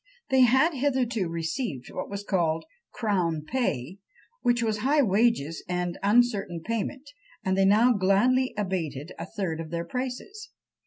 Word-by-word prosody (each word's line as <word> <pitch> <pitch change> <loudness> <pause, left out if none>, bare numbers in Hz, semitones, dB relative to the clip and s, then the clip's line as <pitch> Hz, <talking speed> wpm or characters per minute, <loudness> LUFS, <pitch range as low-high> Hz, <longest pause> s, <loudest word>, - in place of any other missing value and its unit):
They 265 -1 +5
had 265 +7 +5
hitherto 250 - 0
received 165 - -3
what - - -5
was 200 0 -5
called 165 -5 0 0.3
"crown 180 -8 -1
pay," 190 - -2 0.4
which 240 -1 +2
was 215 -2 0
high 285 +5 +3
wages 195 - +1
and 180 -1 -2
uncertain 200 -5 +2
payment 230 +5 -3 0.4
and 190 0 +2
they 195 0 +3
now 220 +5 +5
gladly 235 +7 +2
abated 170 -7 -3
a 165 - -5
third 185 -5 -3
of 165 -1 -6
their 170 0 -3
prices. 260 - -5
200 Hz, 145 wpm, -27 LUFS, 170-250 Hz, 0.4 s, They